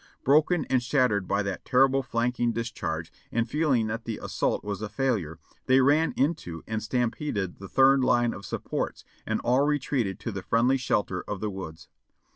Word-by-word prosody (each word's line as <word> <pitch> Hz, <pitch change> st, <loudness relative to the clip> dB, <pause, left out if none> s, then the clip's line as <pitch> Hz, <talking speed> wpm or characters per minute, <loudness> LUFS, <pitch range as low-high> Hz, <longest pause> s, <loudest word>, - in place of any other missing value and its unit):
"Broken 155 Hz, +5 st, +3 dB
and 130 Hz, -2 st, +1 dB
shattered 120 Hz, -7 st, +1 dB
by 100 Hz, +1 st, +1 dB
that 100 Hz, -1 st, -4 dB
terrible 135 Hz, +1 st, +3 dB
flanking 120 Hz, -1 st, 0 dB
discharge, 110 Hz, -8 st, -4 dB, 0.2 s
and 115 Hz, 0 st, 0 dB
feeling 140 Hz, -4 st, +1 dB
that 115 Hz, +2 st, -4 dB
the 115 Hz, -2 st, -3 dB
assault -, -, -1 dB
was 105 Hz, -1 st, -4 dB
a 110 Hz, -, -4 dB
failure, 105 Hz, -, -1 dB, 0.3 s
they 130 Hz, +1 st, +5 dB
ran 145 Hz, +5 st, +4 dB
into 130 Hz, -, -1 dB
and 110 Hz, 0 st, -3 dB
stam 120 Hz, +2 st, 0 dB
peded 100 Hz, -, -4 dB
the 95 Hz, -1 st, -9 dB
third 135 Hz, +1 st, +5 dB
line 120 Hz, -2 st, +3 dB
of 100 Hz, -, -9 dB
supports, -, -, -4 dB, 0.2 s
and -, -, 0 dB
all 125 Hz, +3 st, +3 dB
retreated 135 Hz, -9 st, 0 dB
to 115 Hz, -, -3 dB
the 100 Hz, -1 st, -5 dB
friendly 120 Hz, +7 st, +2 dB
shelter 100 Hz, -7 st, -1 dB
of 105 Hz, -, -4 dB
the 105 Hz, 0 st, -2 dB
woods. 85 Hz, -4 st, -8 dB
115 Hz, 180 wpm, -27 LUFS, 100-135 Hz, 0.3 s, they